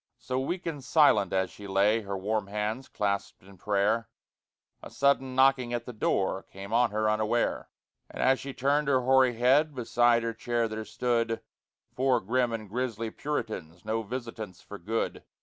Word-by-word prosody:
So 130 +1 -3
weak 175 +7 -3
and 150 -5 -4
silent 120 - +4
as 95 -1 0
she 100 - -10
lay, 100 +3 +3
Her 100 -2 -4
warm 105 +1 -1
hands 105 +5 -3
clasped 100 -2 -2
in 95 -1 -16
prayer, 105 +3 +1 0.7
A - - -9
sudden 135 -1 +1
knocking 130 -2 +3
at 120 -1 -2
the 125 - -7
door 95 -3 0
Came 100 +2 -10
on 120 0 +4
her 110 +1 0
unaware. 110 +2 0 0.4
And - - -10
as 130 0 +4
she 140 - -6
turned 140 +2 +1
her 130 -2 +3
hoary 130 -1 +4
head, 135 +6 +3
Beside 120 -1 +3
her 115 0 -2
chair 115 0 -1
there 110 0 -5
stood 115 +1 0 0.5
Four 130 -1 +2
grim 120 +4 0
and 110 -2 -4
grisly 115 0 -3
Puritans 100 - -5
No 110 +1 -1
visitants 115 -4 -6
for 105 - -10
good. 110 +6 -2
115 Hz, 170 wpm, -28 LUFS, 105-130 Hz, 0.7 s, silent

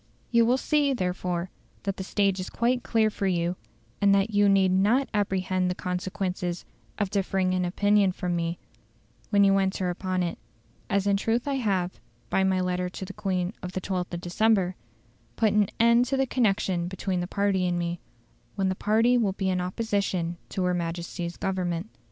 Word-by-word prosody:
You 235 -1 +4
will 250 +2 +4
see, 290 0 +2
therefore, 180 -3 -2 0.3
that 195 -1 -2
the 190 - -4
stage 195 0 +1
is 185 - -4
quite 245 +2 +1
clear 220 -2 +2
for 200 - -2
you, 175 -1 0 0.5
and 200 -1 +5
that 200 +2 +1
you 205 -1 +4
need 195 -1 +4
not 215 +9 +3
apprehend 185 -3 0
the 180 - -2
consequences 180 -1 -3 0.3
of 200 -2 -1
differing 190 -2 0
in 180 0 +1
opinion 205 +2 +3
from 180 -1 -2
me 170 0 -2 0.7
when 205 -1 +4
you 195 - +5
will 195 - +4
enter 190 -1 0
upon 185 0 -2
it; 170 - -3 0.5
as 200 -1 +1
in 200 -1 +3
truth 230 +5 0
I 280 -1 0
have, 190 - -1 0.3
by 190 - +3
my 190 -1 +2
letter 180 0 -1
to 190 - -7
the 200 - -8
Queen 185 -1 -2
of 180 0 -6
the - - -1
12th 180 -2 -3
of 170 - -5
December, 185 0 +2 0.6
put 220 -2 +2
an 210 -2 +3
end 235 +1 +5
to 270 +2 -1
the 270 - +2
connection 195 -8 +1
between 190 0 -2
the 175 - -2
party 200 -2 +1
and 175 0 0
me, 170 0 -2 0.6
when 195 -2 +1
the - - +1
party 225 +5 +3
will 205 -5 +1
be 190 -1 -1
in 180 -1 0
opposition 185 -3 -1
to 190 - -2
her 180 0 +1
Majesty's 170 0 -4
Government." 185 0 -2
190 Hz, 190 wpm, -27 LUFS, 180-205 Hz, 0.7 s, and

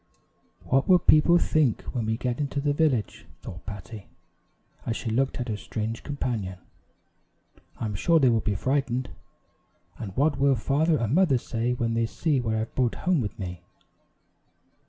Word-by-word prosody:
"What 135 +1 +1
will 185 - +8
people 170 0 +5
think 155 -8 +1
when 120 -4 -2
we 110 0 0
get 125 +1 -2
into 140 -1 -2
the 145 0 +1
village?" 140 - 0 0.2
thought 90 - -9
Patty, 105 0 -8 0.8
as 115 - -2
she 115 - -4
looked 135 +4 0
at 125 - -3
her 110 - -2
strange 110 +2 -4
companion; 115 -10 -3 1.2
"I'm 110 -2 -3
sure 165 - +3
they 130 -4 +5
will 115 - +2
be 105 -1 -1
frightened, 130 +2 -1 0.9
and 100 -2 -7
what 145 +1 +2
will 140 0 +4
father 150 +7 +1
and 115 0 -1
mother 165 -6 +4
say 120 +1 -2
when 115 -2 -1
they 115 0 +1
see 145 +1 0
what 110 -2 -1
I 110 - 0
have 110 - -6
brought 125 -3 0
home 180 -6 +1
with 105 - -5
me?" 90 -3 -6
125 Hz, 170 wpm, -26 LUFS, 110-145 Hz, 1.2 s, will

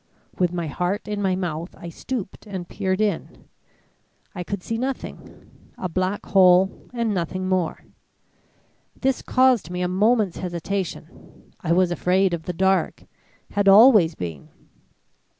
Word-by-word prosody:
With 180 -2 +2
my 175 -1 -3
heart 180 +6 -2
in 210 -1 -3
my 190 -2 +1
mouth, 170 -2 -4
I 170 - -8
stooped 215 +2 -6
and 185 -4 -6
peered 190 0 -2
in. 210 -1 -3 0.9
I 180 -4 -5
could 190 +1 -5
see 225 0 -3
nothing 265 +1 -6 0.3
a 185 - -3
black 185 +4 -2
hole 185 -1 +4
and 235 -3 -1
nothing 185 +1 -2
more. 185 -3 -1 1.1
This 265 -1 0
caused 255 -8 +3
me 180 0 -3
a - - +1
moment's 205 +1 +1
hesitation. 175 -1 -6
I 170 - -3
was 180 0 +3
afraid 180 +2 +2
of 165 -1 -4
the - - -2
dark 190 +2 0 0.5
had 205 -1 0
always 200 -5 +7
been. 80 -5 -7
185 Hz, 140 wpm, -23 LUFS, 175-205 Hz, 1.1 s, always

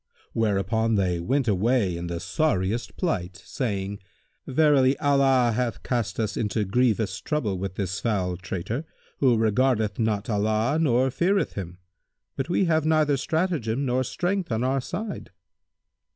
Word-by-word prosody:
Whereupon 110 +1 +1
they 90 -3 +1
went 130 +9 0
away 105 -1 +2
in 85 +1 -5
the 85 0 -3
sorriest 115 - -1
plight, 95 - -2
saying, 100 -6 -3 0.5
"Verily, 140 -2 +4
Allah 135 -4 +3
hath 120 -3 -2
cast 115 -5 -2
us 110 -2 -1
into 105 0 -1
grievous 110 -2 +1
trouble 110 - -1
with 95 -1 -4
this 100 -1 -2
foul 95 -6 -1
traitor, 95 - -4 0.4
who 125 -4 +4
regardeth 110 -1 +1
not 110 -2 0
Allah 110 +6 +1
nor 130 -3 +2
feareth 190 +8 +1
Him; 90 -3 -6 0.6
but 135 +4 -3
we 180 +2 +2
have 160 -2 +2
neither 155 -2 +3
stratagem 140 -4 -1
nor 130 0 +1
strength 180 +5 -2
on 110 +2 0
our 135 +1 +1
side." 210 - -5
115 Hz, 140 wpm, -25 LUFS, 100-140 Hz, 0.6 s, Verily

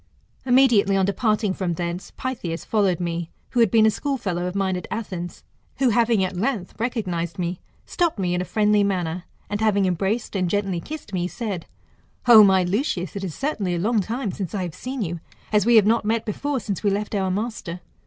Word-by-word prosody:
Immediately 245 -6 +5
on 190 - +3
departing 215 0 +1
from 180 -2 -2
thence, 175 +2 -4
Pytheas 185 -11 -4
followed 200 -6 +1
me, 170 -1 -3 0.2
who 245 - 0
had 230 -3 +5
been 220 +2 +5
a 220 - +5
schoolfellow 205 -11 -2
of 180 - -5
mine 190 -2 0
at 180 - -5
Athens, 185 -5 -5 0.3
who 265 -2 +3
having 230 -3 +3
at 185 0 -2
length 205 -1 -2
recognised 190 -7 -2
me, 175 0 -2 0.3
stopped 345 -7 0
me 180 -3 0
in 180 - 0
a - - -3
friendly 210 +1 +3
manner, 180 -3 -1 0.2
and 205 +1 -3
having 205 -3 +3
embraced 195 +6 -1
and 185 -2 +1
gently 195 -3 -1
kissed 300 - -8
me, 180 -1 0
said, 200 -5 -5 0.6
O 225 -3 +10
my 190 -2 +5
Lucius, 185 - -1
it 195 - -4
is 180 -5 -4
certainly 215 -11 -1
a - - -2
long 220 +5 +2
time 225 +2 -3
since 190 +1 -5
I 190 - -1
have 175 -3 -5
seen 255 +3 -4
you, 170 -2 -4 0.3
as 210 0 +3
we 240 - +6
have 215 -3 +7
not 225 +2 +3
met 225 +1 0
before 275 +6 -2
since 200 -3 -4
we 205 - +2
left 205 +2 -2
our 190 -2 0
master. 195 -3 -3
200 Hz, 205 wpm, -23 LUFS, 180-225 Hz, 0.6 s, O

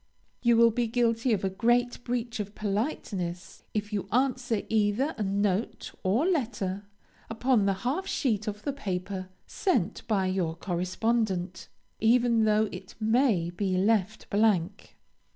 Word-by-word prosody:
You 235 -1 +4
will 230 0 +6
be 240 +1 0
guilty 235 +1 +1
of 205 -3 +1
a 190 - +1
great 240 +4 +1
breach 240 -1 -3
of 205 0 -5
politeness, 195 - -3
if 210 0 -2
you 195 -2 -2
answer 250 -2 +1
either 220 +7 +1
a - - -6
note 200 +1 -1
or 215 - +2
letter 220 - -1 0.4
upon 225 -2 +2
the 195 - +3
half 320 +10 -1
sheet 220 - 0
of 210 0 -4
the 285 - -2
paper 185 -5 -4 0.2
sent 255 - 0
by 200 -4 +1
your 185 -3 -1
correspondent, 185 +1 -1 0.3
even 230 0 +4
though 215 0 +3
it 185 +1 -9
may 220 -6 +2
be 185 +1 -1
left 210 +1 +1
blank. 205 -2 +1
215 Hz, 140 wpm, -28 LUFS, 190-240 Hz, 0.4 s, will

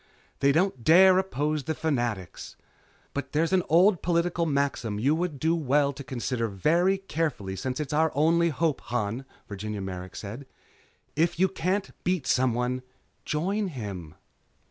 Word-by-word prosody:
They 140 - +4
don't 160 -5 +1
dare 185 +5 +7
oppose 150 -5 -1
the 160 - -2
Fanatics. 120 - -3 0.6
But 135 -2 -5
there's 165 +4 +1
an 185 - +4
old 180 +3 +5
political 170 0 +1
maxim 140 -7 -1
you 135 +7 +3
would 160 -3 -2
do 160 +3 +2
well 145 -2 +2
to 140 - -8
consider 125 -2 -2
very 170 - +2
carefully 155 - -3
since 130 +8 -3
it's 150 -1 -3
our 160 +1 +3
only 165 +3 +3
hope, 160 -1 0
Han," 120 +2 -2 0.2
Virginia 105 +1 -5
Merrick 95 -1 -6
said, 115 +7 -7 0.7
"'If 165 +3 +1
you 190 - +5
can't 190 +2 -2
beat 180 -5 0
someone 125 0 +1 0.4
join 195 +7 -1
him.'" 100 - -7
145 Hz, 145 wpm, -27 LUFS, 120-170 Hz, 0.7 s, dare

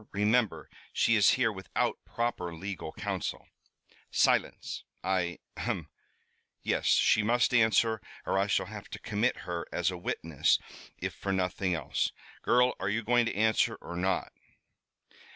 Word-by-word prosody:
Remember, 105 - +1 0.2
she 115 - +3
is 105 -2 +6
here 125 -3 +2
without 95 -2 -2
proper 105 -8 -2
legal 90 -2 -5
council." - - -3 0.6
"Silence! - - +1 0.2
I 90 -2 0 0.2
ahem - - -3 0.7
yes, - - 0
she 110 - +5
must 120 +4 +2
answer, 110 -1 +4 0.2
or 95 - +1
I 100 - +2
shall 100 - +1
have 105 +1 -9
to - - -7
commit 110 +4 0
her, 85 -2 -4
as 90 +1 +1
a 90 - -5
witness 80 -4 +1 0.4
if - - -3
for 100 - -4
nothing 90 -1 0
else. 80 - -1 0.3
Girl, 125 +1 +4
are 95 - -1
you 110 +2 -1
going 120 +1 +3
to - - -2
answer 110 +2 +2
or 85 - -9
not?" 95 +2 -1
100 Hz, 145 wpm, -30 LUFS, 90-115 Hz, 0.7 s, is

